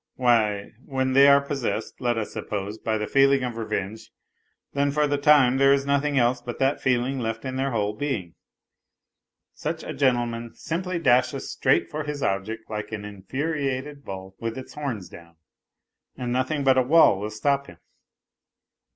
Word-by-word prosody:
Why, 110 -5 +2
when 130 -1 -1
they 140 +1 +7
are 140 0 +6
possessed, 140 -4 -3
let 120 -2 +1
us 110 - -3
suppose, 105 +1 -4
by 110 -1 -1
the 105 - -2
feeling 135 +2 +4
of 125 -2 -3
revenge, 110 -1 -4 0.6
then 140 0 +1
for 150 +1 +2
the 145 -1 0
time 140 -3 +5
there 135 0 +5
is 140 0 +2
nothing 140 +1 +1
else 125 0 +2
but 120 0 -6
that 135 +1 +1
feeling 130 +1 +1
left 115 +1 -3
in 130 0 -4
their 135 +1 0
whole 105 -4 -1
being. 105 - -3 1.2
Such - - -4
a - - -5
gentleman 120 -3 0
simply 180 +2 -3
dashes 130 -3 +2
straight 130 - +2
for 155 0 -3
his 150 -1 -4
object 110 +4 -2
like 105 0 -5
an 105 -2 -5
infuriated 140 - -3
bull 95 -2 -8
with 115 +1 -4
its 130 - -8
horns 130 -11 -4
down, 85 0 -14 0.8
and 120 -1 -3
nothing 130 +3 0
but 130 -1 +4
a - - +5
wall 130 -6 +5
will 105 +1 -3
stop 140 +6 0
him. - - -13
130 Hz, 170 wpm, -25 LUFS, 110-140 Hz, 1.2 s, they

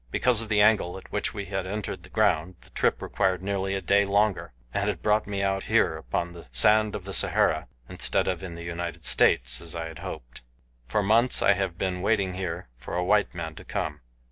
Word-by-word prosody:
Because 120 - +2
of 115 - -6
the 105 -2 +3
angle 105 -4 +3
at 95 - -13
which 105 - -1
we 100 -1 -4
had 95 -1 -3
entered 105 +2 -4
the - - -15
ground 80 +4 +1
the - - -19
trip - - 0
required 95 -1 0
nearly 95 0 -1
a 95 - -2
day 100 +1 +3
longer, 100 -5 +1 0.2
and 100 -3 -1
brought 105 -1 +2
me 100 -1 -2
out 95 0 0
here - - +2
upon 85 +8 -3
the 85 -5 -12
sand 105 - +4
of 95 - -6
the 100 - -6
Sahara - - +2 0.2
instead - - -1
of 90 -2 -1
in 90 -3 -7
the 85 - -8
United 85 0 -4
States - - +3
as 85 0 -6
I 85 -1 -3
had 80 - -10
hoped. - - -8 0.5
For 100 +12 0
months 115 +5 +4
I 100 - +6
have 95 -3 -3
been 90 -1 -2
waiting 100 -2 +1
here 90 -3 -4
for 65 - -7
a 90 - 0
white 100 -1 +2
man 80 -2 -5
to - - -12
come. 75 -1 -4
95 Hz, 220 wpm, -26 LUFS, 85-100 Hz, 0.5 s, I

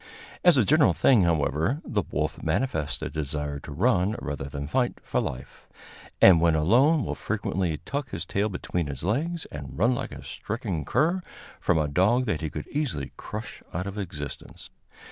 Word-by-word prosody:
As 175 -5 +6
a 120 - +4
general 150 +4 +5
thing, 115 -9 +4
however, 80 - +1
the 105 - 0
wolf 75 -1 -2
manifests 80 - -1
a - - -2
desire 75 -1 -3
to 70 - -10
run, 95 - +2
rather 70 -2 -4
than 70 +1 -5
fight, 120 - +1
for - - 0
life, 65 0 -7 0.5
and 90 -4 +8
when 85 -1 +4
alone 125 - +4
will - - -2
frequently 95 -6 -2
tuck 140 - -4
his - - -5
tail 105 +2 0
between 90 -3 -3
his 70 -1 -6
legs, 160 - -1
and 70 -3 -7
run 115 +8 +3
like 120 - -4
a - - -9
stricken 105 -8 -4
cur 170 +4 +2 0.4
from - - +2
a 75 -1 +1
dog 105 - +3
that 105 -9 -1
he 80 - -2
could - - -6
easily 120 - -2
crush 110 +1 -7
out 90 +2 -1
of 100 +1 -5
existence. 80 -7 -7
90 Hz, 180 wpm, -26 LUFS, 75-120 Hz, 0.5 s, and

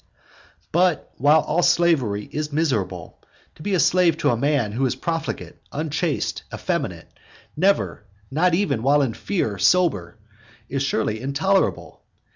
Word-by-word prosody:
V. - - -30
But, 175 -1 +1
while 150 +4 +5
all 160 +4 0
slavery 135 -14 +2
is 150 0 -3
miserable, 110 - -2 0.3
to - - -16
be 195 +2 0
slave 180 -1 +3
to - - +2
a - - +1
man 135 -3 0
who 120 +6 -2
is 125 - -2
profligate, 165 +4 -4
unchaste, 155 +1 -2
effeminate, - - -4 0.4
never, 190 - +1 0.3
not 165 +4 +2
even 185 - 0
while 140 +3 +3
in 120 -4 -1
fear, 110 - -2
sober, 155 - +2 0.5
is 135 0 -2
surely 110 -5 -1
intolerable. 190 +9 0
150 Hz, 135 wpm, -22 LUFS, 120-170 Hz, 0.5 s, while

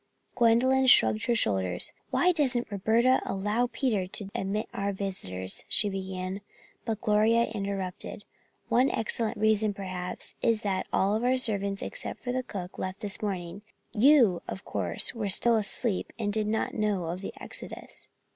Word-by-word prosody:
Gwendolyn 255 +3 +4
shrugged 110 - +5
her 240 - +2
shoulders. 95 - 0 0.2
"Why 265 +8 +3
doesn't 255 - 0
Roberta 225 +6 +3
allow 210 +5 0
Peter 215 -9 0
to 195 +1 -4
admit 200 +3 -2
our 200 0 -1
visitors," 95 - -4
she 205 - +2
began, 190 0 -4 0.4
but 220 -3 -2
Gloria 220 +1 +3
interrupted: 200 -2 -4 0.4
"One 255 +3 +3
excellent 225 +1 0
reason, 215 -1 +2
perhaps, 185 -2 -6
is 230 -2 +2
that 190 -2 -1
all 205 +4 +1
our 255 +1 +3
servants 200 -5 -1
except - - -6
the 250 +1 0
cook 190 -7 -7
left 185 +2 -4
this 205 -3 -4
morning. 190 -2 -4 0.3
You, 235 - +5
of 190 - -6
course, 90 -4 +2
were 215 -4 -3
still 235 +4 +3
asleep 215 0 -1
and 205 -3 -2
did 215 -1 0
not 220 +1 -1
know 210 -5 0
of 175 +3 -4
the - - -6
exodus." - - -7
210 Hz, 150 wpm, -28 LUFS, 190-230 Hz, 0.4 s, shrugged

